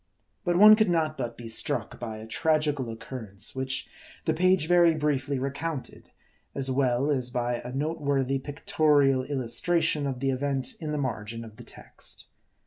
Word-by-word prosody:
But 175 Hz, -2 st, +1 dB
one 210 Hz, +4 st, +9 dB
could 215 Hz, -3 st, +2 dB
not 160 Hz, -3 st, +1 dB
but 120 Hz, -4 st, -4 dB
be 120 Hz, -, -8 dB
struck 115 Hz, -, -1 dB
by 110 Hz, -3 st, -5 dB
a 110 Hz, -, -8 dB
tragical 150 Hz, 0 st, 0 dB
occurrence, 110 Hz, -3 st, -5 dB
which 130 Hz, +1 st, -3 dB, 0.4 s
the 160 Hz, -, +2 dB
page 185 Hz, 0 st, +3 dB
very 175 Hz, -1 st, +5 dB
briefly 145 Hz, -2 st, 0 dB
recounted:. 140 Hz, +2 st, -5 dB, 0.5 s
as 135 Hz, -1 st, -1 dB
well, 130 Hz, +1 st, +1 dB
as 130 Hz, -3 st, 0 dB
by 120 Hz, 0 st, -1 dB
a 125 Hz, -, -7 dB
note 150 Hz, +5 st, -2 dB
worthy 135 Hz, -1 st, +1 dB
pictorial 145 Hz, -1 st, +2 dB
illustration 145 Hz, +4 st, 0 dB
of 130 Hz, -2 st, -3 dB
the 135 Hz, +1 st, +1 dB
event 135 Hz, 0 st, -2 dB
in 155 Hz, -2 st, -4 dB
the 150 Hz, -, -1 dB
margin 115 Hz, -4 st, -3 dB
of 110 Hz, -1 st, -13 dB
the -, -, -10 dB
text. -, -, -10 dB
135 Hz, 165 wpm, -27 LUFS, 125-155 Hz, 0.5 s, one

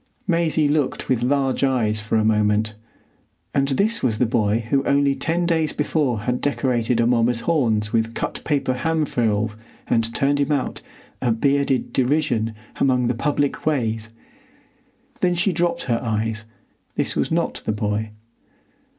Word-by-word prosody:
Maisie 165 Hz, -4 st, +2 dB
looked 145 Hz, -2 st, -1 dB
with 125 Hz, -3 st, +2 dB
large 135 Hz, +1 st, +1 dB
eyes 115 Hz, -6 st, +1 dB
for 105 Hz, +2 st, -2 dB
a 110 Hz, -, +2 dB
moment. 105 Hz, 0 st, +2 dB, 0.8 s
And 140 Hz, 0 st, +2 dB
this 200 Hz, -, +1 dB
was 115 Hz, -4 st, +1 dB
the 125 Hz, -, +2 dB
boy 110 Hz, 0 st, +1 dB
who 140 Hz, -1 st, +3 dB
only 140 Hz, 0 st, +3 dB
ten 165 Hz, +6 st, -1 dB
days 160 Hz, -3 st, +1 dB
before 145 Hz, -7 st, 0 dB
had 125 Hz, +3 st, -1 dB
decorated 125 Hz, -4 st, 0 dB
Amomma's 115 Hz, 0 st, +2 dB
horns 115 Hz, -9 st, +1 dB
with 115 Hz, 0 st, 0 dB
cut -, -, -4 dB
paper 140 Hz, -4 st, 0 dB
ham 160 Hz, +4 st, 0 dB
frills 110 Hz, -4 st, 0 dB, 0.3 s
and 115 Hz, -1 st, +1 dB
turned 140 Hz, +1 st, +2 dB
him 145 Hz, +1 st, +1 dB
out, 140 Hz, -3 st, -1 dB, 0.4 s
a 125 Hz, -, +1 dB
bearded 140 Hz, +2 st, +1 dB
derision, 130 Hz, -4 st, +1 dB, 0.3 s
among 125 Hz, -2 st, +2 dB
the -, -, +2 dB
public 145 Hz, +3 st, -1 dB
ways! 115 Hz, -7 st, 0 dB, 1.1 s
Then 180 Hz, -1 st, +2 dB
she 175 Hz, +2 st, +1 dB
dropped 170 Hz, 0 st, 0 dB
her 115 Hz, -2 st, 0 dB
eyes: 110 Hz, -1 st, -2 dB, 0.5 s
this -, -, -1 dB
was -, -, 0 dB
not -, -, -1 dB
the -, -, +1 dB
boy. 105 Hz, +1 st, -2 dB
125 Hz, 150 wpm, -22 LUFS, 110-145 Hz, 1.1 s, who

